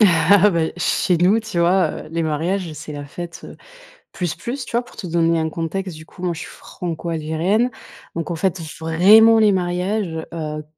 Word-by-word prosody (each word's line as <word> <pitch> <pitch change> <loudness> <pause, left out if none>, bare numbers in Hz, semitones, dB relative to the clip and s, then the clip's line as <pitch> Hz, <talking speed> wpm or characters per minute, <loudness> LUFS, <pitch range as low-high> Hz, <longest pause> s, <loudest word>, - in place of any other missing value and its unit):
Bah, 180 -1 +5
chez 180 0 +1
nous, 185 +6 +4
tu 220 -5 -5
vois, 175 -1 +3 0.2
heu, - - -12
les 165 0 -1
mariages, 165 +3 -1
c'est 150 0 -8
la 145 -1 -6
fête, 170 +4 -8
heu, - - -11 0.6
plus, 175 -4 -3
plus, 255 +2 -5
tu - - -11
vois? 240 - 0
Pour - - -17
te 185 - -6
donner 165 0 +2
un 160 0 -1
contexte, 170 +3 -4
du 155 0 -11
coup, 180 - -13
moi 175 -1 0
je 160 - -8
suis - - -7
franco-algérienne. 170 +6 -2 0.5
Donc 165 +1 -3
on - - -2
fête 185 +2 -1 0.2
vraiment 205 +8 +6
les 215 -1 +5
mariages, 180 -1 -1
heu, 155 -2 -4
175 Hz, 190 wpm, -20 LUFS, 160-195 Hz, 0.6 s, vraiment